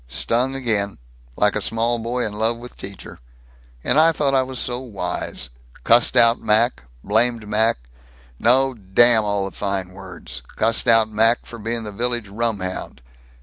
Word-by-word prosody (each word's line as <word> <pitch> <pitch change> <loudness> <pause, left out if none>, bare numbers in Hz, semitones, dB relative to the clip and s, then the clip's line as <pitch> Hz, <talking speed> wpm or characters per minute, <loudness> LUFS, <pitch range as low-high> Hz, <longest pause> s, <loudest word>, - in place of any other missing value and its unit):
Stung 120 - 0
again! 105 -6 -1 0.4
Like 105 0 +1
a 105 - -1
small 115 +3 -1
boy 120 +2 -2
in 105 - -5
love 110 +2 0
with 125 +1 -11
teacher. 100 -1 -10 0.6
And 140 - +2
I 165 +1 +5
thought 145 -3 -1
I 135 - +4
was 130 0 -5
so 125 0 -1
wise! 90 - -5 0.3
Cussed 120 - +4
out 115 0 +5
Mac 110 - +2 0.2
blamed 115 +1 +1
Mac 110 +2 +2 0.6
no, 130 +3 +3
damn 110 +2 +4
all 100 -1 -1
the 95 - -11
fine 100 -2 -3
words 95 -9 -9
cussed 115 +3 +1
out 115 -1 +4
Mac 115 +3 +3
for 120 - -10
being 115 +2 -3
the 105 - -7
village 120 0 -2
rumhound. 100 - -4
115 Hz, 160 wpm, -21 LUFS, 100-120 Hz, 0.6 s, I